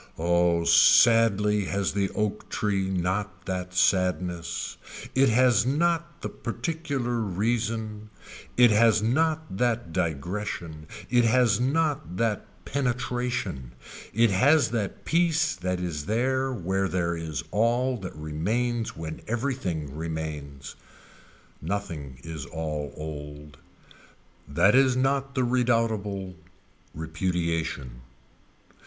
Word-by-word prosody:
Oh 85 0 +2
sadly 105 +3 +5
has 100 0 -1
the 100 -1 0
oak 105 0 -2
tree 100 -2 0
not 95 0 -2
that 90 -1 -4
sadness. 90 -2 0 0.4
It 135 0 +4
has 120 -2 +4
not 170 +4 0
the - - -1
particular 130 -1 -3
reason. 110 +1 -2 0.5
It 120 -2 +7
has 110 0 +4
not 155 0 0
that 120 -6 0
digression. 85 0 -3 0.2
It 120 -1 +4
has 120 -1 +3
not 140 - 0
that 115 -3 0 0.2
penetration. 125 - -2 0.4
It 115 0 +3
has 130 +6 +4
that 110 -4 -3
piece 170 0 +2
that 90 0 -2
is 85 -4 -4
there 130 +4 +1
where 95 -3 -1
there 85 -2 -1
is 80 -2 -4
all 120 +4 +2
that 95 -6 -7
remains 110 +11 -2
when 80 -1 -6
everything 110 - -2
remains. 75 -4 -5 0.9
Nothing 80 -7 -4
is 80 -4 -6
all 75 -3 -4
old. 75 -1 -8 0.9
That 90 +8 +3
is 130 -1 +4
not 135 +1 0
the 130 - +2
redoubtable 115 -6 0 0.6
repudiation. 80 -6 -2
100 Hz, 105 wpm, -26 LUFS, 85-120 Hz, 0.9 s, It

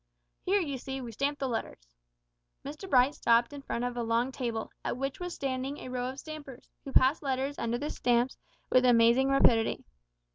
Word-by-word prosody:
"Here, 400 +2 +2
you 285 -7 -3
see, 265 +2 -5
we 240 -3 -6
stamp 280 +6 -1
the 270 - -2
letters." - - -5 0.7
Mr 305 +7 -7
Bright 260 0 +4
stopped 235 +1 +2
in 285 - -7
front 240 -3 -3
of 245 0 -2
a 240 - -2
long 230 +3 0
table, 235 -4 -4
at - - -2
which 275 +1 -3
was 355 -1 -5
standing 270 +1 -3
a - - -8
row 250 0 -2
of 265 +1 -7
stampers, 290 -4 -9 0.2
who 275 - -7
passed 265 +3 +4
letters 275 0 -2
under 235 +1 -1
the 295 +5 -4
stamps 245 +1 +1 0.4
with 255 - +5
amazing 245 +2 +5
rapidity. 235 -4 +3
260 Hz, 190 wpm, -30 LUFS, 240-280 Hz, 0.7 s, with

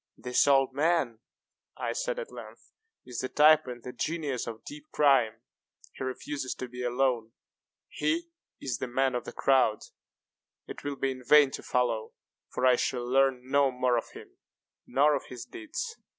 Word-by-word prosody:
"This 125 +3 +2
old 135 -1 +4
man," 145 -6 +1 0.6
I - - -2
said - - -2
at 485 -2 -6
length, - - -12 0.3
"is 125 -2 -6
the 130 - -3
type 155 -1 +5
and 120 -1 -7
the 125 - -7
genius 150 -7 -2
of 115 -1 -7
deep 295 +1 -10
crime. 125 -6 +3 0.5
He - - -7
refuses 130 +1 -4
to 130 - -6
be 125 0 -8
alone. 120 -2 0 0.5
He 335 +1 -2 0.3
is 130 -3 -3
the 130 - -3
man 130 +1 +1
of 125 -1 -3
the - - -6
crowd. 130 -5 +2 0.8
It - - -9
will 145 0 -3
be 135 0 -1
in 130 -1 -8
vain 145 +1 +6
to - - -6
follow; 120 -3 -1 0.4
for 130 - -1
I 125 -1 +6
shall 120 0 -1
learn 130 -1 +2
no 140 0 +3
more 125 -1 +1
of 115 - -2
him, - - -13 0.5
nor 145 +3 +4
of 140 - -2
his 125 - -8
deeds. 370 +7 -6
130 Hz, 175 wpm, -29 LUFS, 125-150 Hz, 0.8 s, vain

